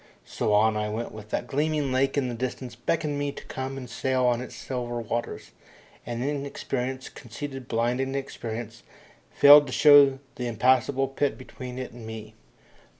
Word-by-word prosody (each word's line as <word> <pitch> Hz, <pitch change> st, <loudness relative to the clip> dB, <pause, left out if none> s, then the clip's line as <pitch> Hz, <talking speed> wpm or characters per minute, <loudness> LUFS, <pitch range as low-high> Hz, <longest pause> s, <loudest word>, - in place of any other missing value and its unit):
So -, -, -2 dB
on 110 Hz, +1 st, +4 dB
I 105 Hz, 0 st, -1 dB
went 110 Hz, +3 st, -4 dB
with 110 Hz, -1 st, -11 dB
that -, -, -2 dB
gleaming 145 Hz, +1 st, 0 dB
lake 135 Hz, +2 st, +1 dB
in 135 Hz, -3 st, +1 dB
the 125 Hz, -, -3 dB
distance 125 Hz, +1 st, -4 dB
beckoning 145 Hz, +4 st, -1 dB
me 145 Hz, 0 st, -1 dB
to -, -, -10 dB
come 130 Hz, +1 st, -5 dB
and 130 Hz, -2 st, -7 dB
sail 130 Hz, +1 st, 0 dB
on 120 Hz, -1 st, +2 dB
its 125 Hz, -1 st, -8 dB
silver 120 Hz, -1 st, -4 dB
waters, 115 Hz, +1 st, -4 dB, 0.6 s
and 120 Hz, 0 st, -3 dB
Inexperience, 135 Hz, -2 st, -3 dB
conceited, 135 Hz, +2 st, -8 dB
blind 120 Hz, +3 st, 0 dB
Inexperience, 120 Hz, -4 st, -5 dB, 0.5 s
failing 145 Hz, 0 st, +8 dB
to -, -, -6 dB
show 145 Hz, -1 st, +7 dB, 0.2 s
the 125 Hz, -, -3 dB
impassable 130 Hz, +4 st, +2 dB
pit 135 Hz, +1 st, -1 dB
between 130 Hz, -1 st, -9 dB
it 130 Hz, -1 st, -5 dB
and 120 Hz, -2 st, -10 dB
me. 110 Hz, -1 st, -8 dB
130 Hz, 165 wpm, -26 LUFS, 120-135 Hz, 0.6 s, failing